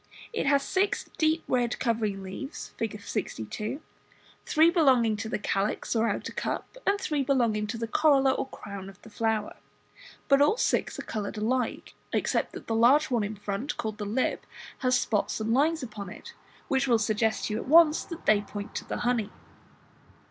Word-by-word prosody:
It 445 - -1
has 280 0 +4
sic 395 +2 +1 0.2
deep 315 +1 +2
red 245 -1 +1
covering 215 -5 -1
leaves, 270 +11 -7
Fig. 225 -2 -3
62, 210 - -4 0.7
three 320 +2 +5
belonging 260 - +4
to 220 - -4
the - - -1
calyx 205 +3 -1
or 230 0 +2
outer - - -3
cup, - - -4
and 400 +1 +3
three 300 -6 -1
belonging 235 -6 +1
to 225 +3 -4
the 230 0 -3
corolla 275 +1 +4
or 265 - -2
crown 200 -6 -8
of 195 0 -15
the 220 - -13
flower; 220 -1 -1 0.7
but 275 -1 +5
all 300 +10 +4
six - - 0
are - - -5
coloured 215 -1 -4
alike, 235 +3 -1 0.2
except - - 0
that - - -8
the 225 - -2
large 260 +7 +4
on 235 -3 +2
in 210 +1 -3
front, 205 +8 -4
called 215 -1 -4
the 205 - -3
"lip", 225 +6 -1 0.4
has 255 -1 +3
spots 210 0 0
and 220 +1 0
lines 305 +3 +2
upon 210 -5 -7
it - - -11 0.3
which 270 -2 +1
will 235 -2 +4
suggest 220 +1 0
to 210 - -2
you 215 - -1
at - - -7
once 315 +1 +6
that 335 -1 -9
they 210 -1 +5
point 205 0 -7
to - - -4
the - - -4
honey. 240 -4 +1
230 Hz, 185 wpm, -28 LUFS, 210-275 Hz, 0.7 s, once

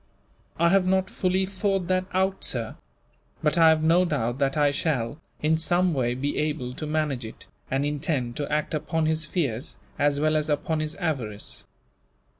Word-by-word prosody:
"I 170 +1 +4
have 190 0 +3
not 190 0 +1
fully 185 +1 +1
thought 195 -1 -1
that 185 0 +2
out, 190 +1 0
sir; 115 -3 -1 0.7
but 150 - +3
I 165 -2 +7
have 155 -1 +3
no 170 +3 +5
doubt 135 -7 -1
that 140 +1 +1
I 145 -1 +4
shall, 145 -2 -1 0.2
in 160 +1 +3
some 175 +2 +2
way, 125 -3 0
be 140 +3 -2
able 150 -5 -2
to 155 - -5
manage 150 -5 -1
it, 110 - -10 0.2
and 135 +2 0
intend 145 -5 -1
to 145 - -3
act 150 +1 0
upon 160 +1 0
his 160 +1 0
fears 140 -8 -2 0.2
as 145 0 +2
well 155 +1 +2
as 155 0 0
upon 155 +2 0
his 155 0 -3
avarice." 130 - -3
155 Hz, 180 wpm, -26 LUFS, 140-170 Hz, 0.7 s, I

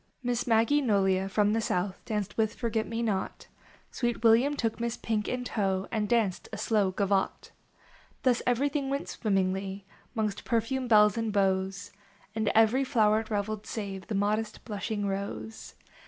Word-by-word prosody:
/, - - -42
Miss 245 0 -1
Maggie 230 +6 +3
Nolia 195 -5 +2
from 205 +1 +2
the 225 - +1
south 185 -2 -2
Danced 210 -3 -3
with 220 -1 0
Forget 225 -2 -1
me 230 +1 -2
not; 200 -4 -2 0.5
Sweet 240 -2 -2
William 235 +6 +5
took 225 -5 -2
Miss 235 0 -2
Pink 215 -2 -2
in 250 0 -2
tow 195 -5 -1
And 210 -1 -1
danced 225 -6 +1
a - - -5
slow 210 -4 +1
gavotte. 195 0 -1 0.7
Thus 250 -2 +3
everything 275 +3 +1
went 275 +1 -2
swimmingly 195 -1 -1 0.3
Mongst 215 -2 -2
perfumed 245 +2 -1
belles 210 -1 +5
and 225 -1 -1
beaux, 190 -2 +2 0.6
And 220 -1 0
ever} 225 +3 +5
floweret 220 -4 +2
reveled 210 0 -2
save 195 -3 -5
The 220 - -3
modest, 210 +2 -1
blushing 210 -1 -3
Rose. 195 - -5
215 Hz, 155 wpm, -29 LUFS, 200-235 Hz, 0.7 s, William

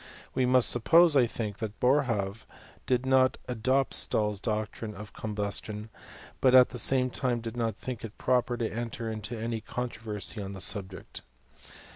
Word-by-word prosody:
We 130 -1 +1
must 125 -1 +5
suppose, 165 +7 +5
I 125 -3 +5
think, 110 -4 -5
that 110 -2 -5
Boerhaave 115 -6 0 0.4
did 125 0 +1
not 130 0 +3
adopt 130 +3 0
Stahl's 105 -2 +3
doctrine 110 0 -4
of 105 +2 -10
com 110 -1 -6
bustion; 105 +1 -3 0.5
but 130 -1 +4
at 125 -1 +8
the 125 - -2
same 130 0 +2
time 125 -2 -1
did 115 0 -7
not 115 -3 -1
think 125 +1 -7
it 110 -2 -8
proper 125 -1 +1
to 115 - -1
enter 115 0 -4
into 110 +2 -6
any 115 0 -3
controversy 110 -4 -4
on 100 0 -6
the 95 - -8
subject. 95 -2 -3
115 Hz, 165 wpm, -28 LUFS, 105-125 Hz, 0.5 s, at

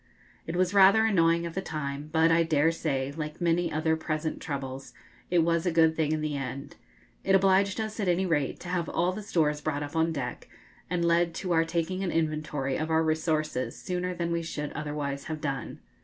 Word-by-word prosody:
It 165 - -3
was 185 +1 +1
rather 200 +3 +6
annoying 170 -5 +3
at 170 - -5
the 190 - -2
time, 150 -3 -5
but, 160 0 +4
I 165 +1 +4
dare 160 -1 +3
say, 140 -5 -2
like 155 -1 -5
many 175 0 +1
other 160 +1 +1
present 155 0 -3
troubles, 135 -2 -5 0.4
it 175 -2 +3
was 170 +1 +1
a - - +2
good 160 -1 +4
thing 155 -2 0
in 155 -1 0
the 155 -1 -2
end. 135 0 -5 0.5
It 195 - +3
obliged 195 +1 +3
us, 220 0 -4
at 200 - -1
any 180 +2 +2
rate, 150 -6 0
to 175 - -7
have 175 -2 -1
all 175 +2 +1
the 205 +3 -6
stores 155 -7 0
brought 145 -1 -2
up 145 +2 -7
on 165 0 +2
deck, 135 -5 -5 0.4
and 175 -1 0
led 170 0 +2
to 180 - -3
our 165 -1 +3
taking 170 +3 -2
an 185 - -1
inventory 155 -4 -1
of 155 +1 -2
our 160 0 +3
resources 155 -5 -1
sooner 180 0 -3
than 170 -1 -2
we 170 0 0
should 150 -3 -4
otherwise 145 -2 -4
have 155 -1 -4
done. 140 -3 -4
165 Hz, 210 wpm, -28 LUFS, 150-175 Hz, 0.5 s, rather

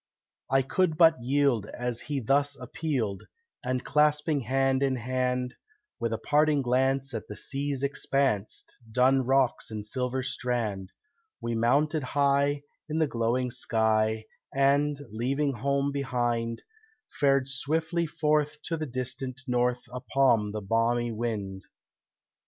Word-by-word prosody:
I 135 0 +3
could 160 +3 +1
but 160 -5 +5
yield 130 -4 +2
as 120 -1 -3
he 145 -2 -3
thus 140 +4 +2
appealed, 125 - -3 0.4
And 130 0 -2
clasping 150 +1 +2
hand 135 +2 +1
in 135 -1 +2
hand, 125 0 -1 0.5
With 115 - -1
a 115 - 0
parting 150 +2 +2
glance 130 +1 +1
at 115 - -5
the 105 - -7
sea's 140 +1 -2
expanse, 135 -6 0 0.3
Dun 130 +3 +4
rocks 130 -1 +1
and 105 -2 -5
silver 130 +3 -2
strand, 110 -7 -2 0.5
We 120 - -3
mounted 145 +7 +2
high 140 +1 +1 0.3
in 155 - -1
the 160 - +3
glowing 125 -1 0
sky, 110 -2 +1 0.3
And, 140 +2 +2
leaving 135 +6 0
home 140 +3 0
behind, 120 -4 -1 0.6
Fared 140 -2 +3
swiftly 160 +5 -1
forth 150 -1 +1
to 165 - -2
the 155 -1 -3
distant 130 +1 -4
north 125 -1 +1
Upon 125 -4 +2
the 105 0 -4
balmy 115 +3 +1
wind. 105 -4 -4
130 Hz, 130 wpm, -28 LUFS, 120-140 Hz, 0.6 s, but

